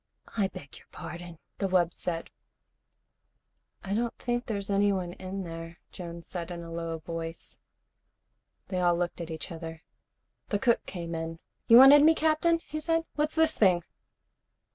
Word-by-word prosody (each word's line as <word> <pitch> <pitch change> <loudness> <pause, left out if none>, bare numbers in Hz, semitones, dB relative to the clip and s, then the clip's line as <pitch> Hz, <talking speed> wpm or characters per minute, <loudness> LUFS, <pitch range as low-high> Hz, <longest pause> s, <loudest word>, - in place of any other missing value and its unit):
"I 205 -4 +2
beg 145 -7 -11
your - - -22
pardon," 175 -1 -8 0.2
the 195 - +1
wub 180 -2 +2
said. 165 -2 -4 1.5
"I 195 - -3
don't 235 +2 -1
think 240 0 -2
there's 200 -2 -2
anyone 195 -3 +1
in 190 +1 -5
there," 165 0 -7
Jones 170 -2 -8
said 175 -2 -5
in 170 -1 -6
a 165 - -9
low 165 -1 -3
voice. 165 +1 -7 1.1
They 185 - -1
all 175 -1 +3
looked 175 0 -2
at 170 - -6
each 160 +1 -5
other. 165 -1 -7 0.6
The 205 - 0
cook 235 +2 +2
came 170 -3 -5
in. 165 0 -4 0.3
"You 230 - +9
wanted 270 +3 +10
me, 320 +2 +6
Captain?" 320 +2 +2
he 310 - -4
said. 330 +1 +1
"What's 300 0 -1
this 320 0 +3
thing?" 180 -5 +4
180 Hz, 160 wpm, -29 LUFS, 170-235 Hz, 1.5 s, wanted